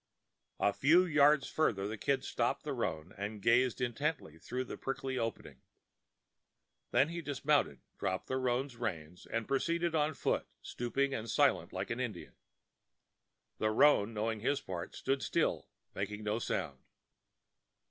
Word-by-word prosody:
A 100 - +3
few 165 - +5
yards 150 -3 +4
farther 100 -11 +1
the 110 - -4
Kid 135 +6 0
stopped - - 0
the - - -3
roan 80 +4 -3
and 105 +1 -4
gazed 120 +4 +3
intently 125 - -2
through 125 +9 -3
the 130 - -7
prickly 135 -1 -3
openings. 115 -1 -4 1.3
Then 145 - +3
he 170 0 -4
dismounted, 145 -1 +1 0.2
dropped 95 +1 -1
the 130 - -2
roan's 130 0 -1
reins, 90 -7 -5
and 115 -1 -2
proceeded 170 +5 0
on 155 -1 +1
foot, - - 0 0.2
stooping 135 +3 -1
and 115 -2 -4
silent, - - +3
like - - -4
an 115 - -2
Indian. 110 -8 -4 1.3
The 110 - +2
roan, 110 -2 +5
knowing 110 0 -2
his 140 +6 +1
part, 90 -1 -6
stood 135 0 -1
still, - - 0 0.3
making 105 +2 -4
no 105 +2 0
sound. 80 - -2
120 Hz, 145 wpm, -33 LUFS, 105-140 Hz, 1.3 s, few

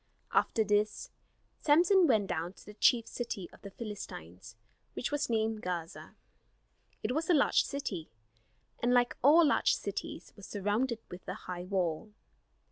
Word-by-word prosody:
After 220 - +2
this 210 0 0 0.5
Samson 345 +4 +5
went 220 -6 +3
down 170 0 -3
to - - -17
the 210 - -10
chief 230 +2 +3
city 210 -7 -5
of - - -17
the 200 - -8
Philistines, 190 - -8 0.4
which 250 - -3
was 290 -3 -1
named 220 -1 0
Gaza. 170 -2 -5 0.9
It - - 0
was 315 +6 -1
a 350 - +6
large 285 - +4
city; 200 - -4 0.7
and 245 +1 +2
like 245 0 +3
all 315 +6 +7
large 290 - +3
cities, - - -6
was 200 - -11
surrounded 215 +5 -1
with 180 +1 -10
a - - -3
high 180 -1 -7
wall. 185 +1 -2
215 Hz, 150 wpm, -31 LUFS, 185-255 Hz, 0.9 s, all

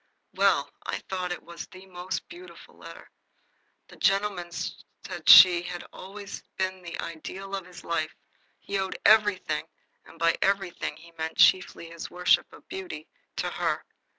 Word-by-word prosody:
Well, - - +2
I - - -2
thought 185 -1 -2
it 175 - -5
was 170 0 -9
a 185 +1 -12
most 180 0 -5
beautiful 355 +1 -13
letter. - - -12 0.8
The - - -15
gentleman 195 -3 +1
said 170 - -6
she 175 -2 +10
had 175 0 -6
always 200 +1 -8 0.2
been 185 0 -2
the 175 -1 -7
ideal 190 +4 -7
of 190 -2 -4
his 180 0 -12
life. 160 -2 -2 0.4
He 200 0 -3
owed 190 0 -3
everything 210 -3 +4 0.4
and - - -16
by 165 0 +2
everything 195 -6 0
he 170 +1 -15
meant 160 0 -3
chiefly 170 -2 +4
his 170 -1 -7
worship 180 0 +2
of - - -16
beauty 170 -5 -7 0.3
to - - -1
her. - - -1
185 Hz, 150 wpm, -27 LUFS, 170-195 Hz, 0.8 s, she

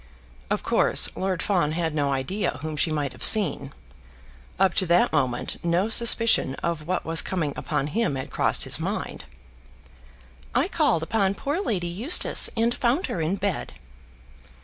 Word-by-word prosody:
Of - - -2
course, - - +3
Lord 185 -3 -2
Fawn 175 -7 0
had 165 -1 -2
no 145 -2 0
idea 135 +7 -2
whom 155 -1 -4
she 155 +2 0
might 145 -3 -2
have - - -10
seen. 150 -10 +4 0.9
Up 190 -2 +3
to 185 - +1
that 170 0 +3
moment 130 -5 -2
no 175 +5 0
suspicion 230 - +3
of 165 -2 -3
what 185 0 -2
was 165 0 +2
coming 160 -7 -3
upon - - -2
him 150 -2 -1
had 130 - -6
crossed - - +1
his - - -3
mind. - - -5 1.3
"I - - +2
called 165 -1 +1
upon 200 +1 0
poor 290 - -3
Lady 200 - -2
Eustace, 210 - +2
and 230 +1 +1
found 250 +7 0
her 170 - -3
in 160 +5 -1
bed." 200 -2 -3
175 Hz, 160 wpm, -24 LUFS, 155-205 Hz, 1.3 s, seen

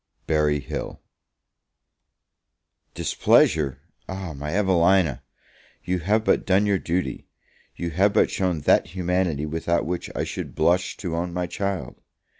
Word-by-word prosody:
Berry 75 -2 +2
Hill. - - -6 2.0
DISPLEASURE? 75 -4 +3 0.3
my 80 -6 -5
Evelina! 90 -7 +3 0.6
you 90 0 -1
have 105 +6 +1
but - - +3
done 95 +2 +3
your 100 -2 +2
duty; 90 +2 -3 0.5
you 85 -1 -4
have 95 +5 +3
but - - +3
shown 90 -5 -1
that 90 - +2
humanity 90 -4 0
without 80 +2 -1
which 90 +2 -3
I - - -1
should - - -6
blush 90 +3 +1
to 85 -4 -4
own 85 +1 -2
my 90 0 -1
child. 100 +1 -4
90 Hz, 125 wpm, -24 LUFS, 80-95 Hz, 2.0 s, DISPLEASURE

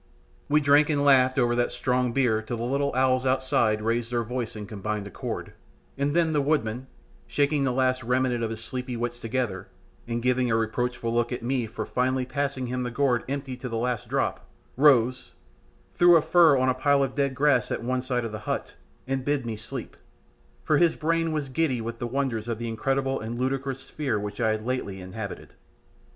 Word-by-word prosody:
We 150 +1 +4
drank 145 +1 +5
and 145 -2 +1
laughed 130 -1 +5
over 120 -2 +3
that 120 0 +1
strong 125 -1 0
beer 115 -4 +2
till 115 +2 -5
the 115 - -4
little 140 +3 0
owls 130 0 +3
outside 130 -5 +1
raised 115 +1 -1
their 120 -1 0
voice 120 0 -4
in 105 -1 -6
combined 105 0 -4
accord, 100 - -6 0.4
and 140 +2 -1
then 165 -2 +3
the 150 - +2
woodman, 130 -4 -1 0.4
shaking 145 -1 +1
the 130 - +1
last 130 0 +1
remnant 125 -1 +1
of 115 - -1
his 115 0 -6
sleepy 125 0 -4
wits 120 +1 -3
together, 115 -6 -3 0.4
and 120 0 -2
giving 125 0 +2
a 115 - +2
reproachful 115 +1 -1
look 120 +1 +1
at 125 -1 -4
me 125 -1 0
for 115 - -5
finally 130 0 0
passing 140 0 -2
him 125 +1 -3
the 125 - -2
gourd 125 -1 +1
empty 135 -2 -3
to 125 0 -6
the 115 - -3
last 120 -1 -2
drop, - - -1 0.3
rose, 130 -3 +3 0.6
threw 175 0 +6
a 165 - +6
fur 165 -5 +5
on 130 0 +2
a 130 - +3
pile 140 +2 +2
of 130 -1 -2
dead 140 -1 0
grass 140 -3 +3
at - - -3
one 130 +1 0
side 125 -2 -1
of 115 - -4
the 110 - -5
hut, - - -2 0.3
and 135 0 -2
bid 145 -2 0
me 115 -1 -3
sleep, 105 - -7 0.7
"for 155 - +3
his 170 -2 +4
brain 165 +1 0
was 150 -3 -2
giddy 135 -1 0
with 115 +1 -5
the 120 - -2
wonders 120 -3 -2
of 115 -2 -2
the 115 +1 -4
incredible 135 +4 -1
and 115 +2 -5
ludicrous 135 +1 -2
sphere 135 -8 -2
which 105 +3 -5
I 110 - +3
had 110 0 -2
lately 120 -7 -3
inhabited." 100 +2 -7
125 Hz, 205 wpm, -26 LUFS, 115-135 Hz, 0.7 s, threw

